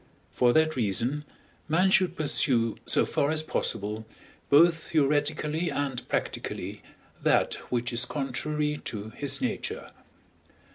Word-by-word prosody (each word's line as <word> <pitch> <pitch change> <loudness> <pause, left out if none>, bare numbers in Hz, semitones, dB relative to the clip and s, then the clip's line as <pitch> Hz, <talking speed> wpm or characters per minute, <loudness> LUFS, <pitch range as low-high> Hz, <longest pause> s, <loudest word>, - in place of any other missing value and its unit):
For 120 -1 +3
that 155 0 +3
reason, 125 +6 0 0.4
man 180 +5 +3
should 185 -1 +3
pursue 130 -6 +2
so - - +4
far 140 - 0
as 155 0 +1
possible, 110 -6 -2 0.4
both 160 +2 +4
theoretically 150 +1 +1
and 135 -5 -3
practically, - - -3 0.4
that - - +3 0.2
which 120 0 -1
is 120 +1 +2
contrary 150 +2 -2
to 110 0 -5
his 140 - -2
nature. 255 - -3
145 Hz, 115 wpm, -27 LUFS, 120-155 Hz, 0.4 s, so